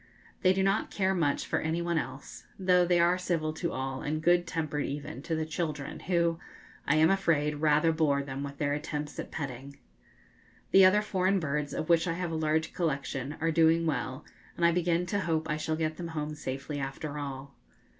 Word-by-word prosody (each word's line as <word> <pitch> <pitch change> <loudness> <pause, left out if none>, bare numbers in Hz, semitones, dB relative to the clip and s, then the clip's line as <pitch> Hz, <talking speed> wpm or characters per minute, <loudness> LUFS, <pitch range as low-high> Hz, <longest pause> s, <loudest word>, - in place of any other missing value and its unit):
They 185 - +5
do 190 0 +1
not 195 +2 +1
care 190 -1 +1
much 160 -6 0
for - - 0
any 160 +2 -1
one 170 -1 0
else, 140 - -8
though 180 -2 +4
they 175 -1 +3
are 175 +2 +3
civil 165 -4 -1
to 170 +2 -3
all 130 0 -3
and 155 +1 -2
good 175 +2 +3
tempered 155 -3 -2
even 140 -2 -5
to 160 +2 -2
the 160 0 -1
children, 155 -3 -4
who, 170 -2 +1 0.5
I 140 - +4
am 160 +3 +5
afraid, 155 -6 +1
rather 155 +1 +4
bore 150 -3 +1
them 135 0 -5
with 140 0 -6
their 145 -1 0
attempts 150 0 -4
at - - -5
petting. 140 -1 -6 0.9
The 190 -1 +8
other 205 +3 +5
foreign 190 -1 +1
birds, 150 -2 -2
of 155 - -3
which 170 0 +3
I 165 - 0
have 175 0 -3
a - - -2
large 160 0 0
collection, 140 -3 -2
are 165 +1 +1
doing 165 +1 +4
well, 135 -1 -2 0.3
and 170 - +2
I 170 - +6
begin 175 0 +1
to 205 +2 -1
hope 160 -4 -1
I 150 -1 -1
shall 155 +1 -1
get 155 -1 -2
them 175 - -5
home 155 -2 -4
safely 140 0 -5
after 140 +2 -4
all. 140 -1 -6
160 Hz, 205 wpm, -29 LUFS, 145-170 Hz, 0.9 s, The